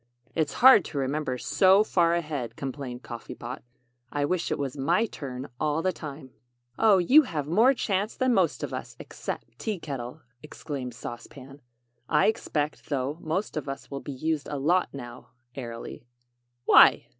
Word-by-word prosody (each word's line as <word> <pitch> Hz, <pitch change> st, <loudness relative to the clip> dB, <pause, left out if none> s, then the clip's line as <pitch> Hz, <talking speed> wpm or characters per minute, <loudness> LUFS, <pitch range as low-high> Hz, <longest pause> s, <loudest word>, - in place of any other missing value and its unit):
"It's 155 Hz, -4 st, 0 dB
hard 260 Hz, -8 st, +9 dB
to 150 Hz, -, -6 dB
remember 135 Hz, -1 st, -1 dB
so 190 Hz, -, +4 dB
far 170 Hz, -5 st, +2 dB
ahead," 150 Hz, -8 st, -3 dB
complained 130 Hz, -2 st, -6 dB
Coffee 120 Hz, -1 st, -8 dB
Pot. 125 Hz, +2 st, -7 dB, 0.5 s
"I 145 Hz, -1 st, 0 dB
wish 180 Hz, +3 st, -1 dB
it -, -, 0 dB
was 140 Hz, -2 st, -3 dB
my 170 Hz, +10 st, +2 dB
turn 135 Hz, -, -7 dB
all 155 Hz, +1 st, 0 dB
the 185 Hz, -, +2 dB
time." 140 Hz, -3 st, -9 dB, 0.5 s
"Oh, 215 Hz, -3 st, +6 dB
you 255 Hz, -, +7 dB
have 155 Hz, -, -3 dB
more 225 Hz, -, +4 dB
chance 205 Hz, -2 st, -1 dB
than 255 Hz, -1 st, +2 dB
most -, -, +1 dB
of -, -, -4 dB
us, -, -, -6 dB
except -, -, -7 dB
Tea 215 Hz, -3 st, -2 dB
Kettle," 140 Hz, -2 st, -6 dB, 0.2 s
exclaimed 140 Hz, -5 st, -6 dB
Sauce 120 Hz, 0 st, -7 dB
Pan. 135 Hz, +1 st, -13 dB, 0.5 s
"I -, -, +4 dB
expect, 150 Hz, -9 st, -1 dB
though, 140 Hz, +2 st, -2 dB
most 165 Hz, +6 st, -2 dB
of 150 Hz, -2 st, -3 dB
us 135 Hz, +1 st, -7 dB
will 140 Hz, -, -4 dB
be -, -, -6 dB
used 150 Hz, +2 st, -2 dB
a 145 Hz, -, -3 dB
lot 175 Hz, +7 st, +2 dB
now," 120 Hz, -4 st, -9 dB, 0.2 s
airily. 120 Hz, -1 st, -8 dB, 0.6 s
"Why?" -, -, +7 dB
145 Hz, 165 wpm, -27 LUFS, 135-175 Hz, 0.6 s, hard